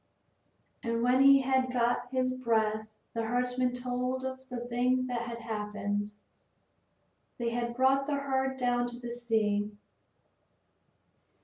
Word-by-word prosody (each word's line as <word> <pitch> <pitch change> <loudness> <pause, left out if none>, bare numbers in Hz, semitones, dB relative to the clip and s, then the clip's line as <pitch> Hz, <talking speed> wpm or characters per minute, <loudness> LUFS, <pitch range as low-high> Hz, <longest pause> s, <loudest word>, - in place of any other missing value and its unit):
And 230 -1 -1
when 250 +2 +4
he 275 0 +8
had 260 -1 +1
got 245 0 +1
his 255 0 0
breath 220 -3 0 0.3
the 230 - -1
herdsman 250 +2 +1
told 250 +1 -2
of 260 0 -6
the 240 -1 -5
thing 250 +1 +1
that 245 -2 -2
had 235 -1 -5
happened. 210 -2 -2 1.3
They 235 -1 -1
had 235 0 -2
brought 270 +2 +3
the 295 - +1
herd 265 -1 -1
down 245 -1 +1
to 240 0 -7
the 240 -1 -6
sea. 220 -4 0
245 Hz, 130 wpm, -30 LUFS, 235-255 Hz, 1.3 s, he